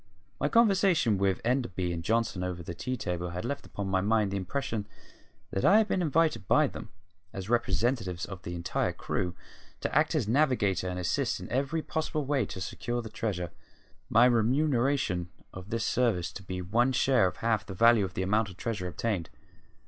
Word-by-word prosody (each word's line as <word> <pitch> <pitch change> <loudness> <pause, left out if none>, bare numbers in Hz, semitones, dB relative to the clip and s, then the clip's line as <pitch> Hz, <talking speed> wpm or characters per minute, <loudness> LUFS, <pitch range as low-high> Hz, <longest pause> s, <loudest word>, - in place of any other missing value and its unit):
My 145 - +1
conversation 190 - +4
with 95 -2 +1
Enderby 115 -8 0
and 85 -1 -4
Johnson 110 -2 0
over 90 -1 -4
the 85 - -6
tea 130 +9 -3
table 90 -4 -3
had 90 +5 -5
left 140 +3 -4
upon 100 -1 -5
my 95 -1 +1
mind 105 0 +2
the - - -2
impression 105 +2 -3 0.6
that 95 - -2
I 200 - +7
had 220 -1 +4
been 190 - 0
invited 160 - +1
by - - +5
them, - - -6 0.4
as 95 +3 -6
representatives 115 -5 0
of 95 -3 -8
the 85 - -6
entire 85 0 -1
crew, 90 -1 -3 0.4
to - - -3
act - - +3
as - - +1
navigator 115 -8 +2
and 90 - -4
assist 90 -1 0
in - - -7
every 140 +5 0
possible 155 -1 -2
way 135 -6 +1
to 95 - -7
secure 120 +5 -3
the 110 - -7
treasure, 100 -6 -3 0.6
my 115 +2 +6
remuneration 125 - +2 0.2
for 95 - -7
this 110 +4 -3
service 105 -8 +1
to - - -8
be 90 -1 -5
one 120 +8 +2
share 125 -5 +4
of 90 - -5
half 115 -3 +1
the 95 - -6
value 115 +1 +5
of 95 -2 -4
the 95 - -1
amount 105 +2 +1
of 95 - -12
treasure 105 -6 -3
obtained. 90 0 -2
110 Hz, 190 wpm, -29 LUFS, 95-130 Hz, 0.6 s, I